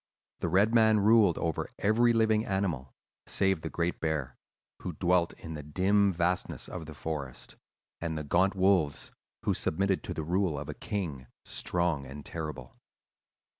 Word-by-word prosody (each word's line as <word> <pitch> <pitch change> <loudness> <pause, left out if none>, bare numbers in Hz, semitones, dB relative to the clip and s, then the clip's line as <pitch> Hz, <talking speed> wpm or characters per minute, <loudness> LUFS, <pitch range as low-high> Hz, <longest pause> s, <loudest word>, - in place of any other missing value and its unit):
The 85 - -1
red 100 +6 +3
man 110 -2 +5
ruled 105 -4 +5
over 80 -1 -2
every 115 +3 +3
living 110 -1 +3
animal, 95 - -2 0.3
save 95 -4 +1
the - - -4
great 85 +1 -1
bear, 75 -6 -2 0.5
who 90 - -4
dwelt 90 0 +2
in 80 - -9
the 75 - -5
dim 95 +7 +2
vastness 90 +1 -1
of 85 -4 -7
the 80 - -9
forest, 70 -4 -5 0.4
and 80 -1 -3
the 75 - -3
gaunt 95 +7 +2
wolves, 95 -6 +2 0.3
who - - +2
submitted 95 +3 0
to - - -4
the 80 - -3
rule 90 -1 0
of 75 +2 -6
a - - -3
king, 80 - -4 0.2
strong 85 -6 -1
and 70 +2 -9
terrible. 75 -6 -6
85 Hz, 160 wpm, -30 LUFS, 75-100 Hz, 0.5 s, man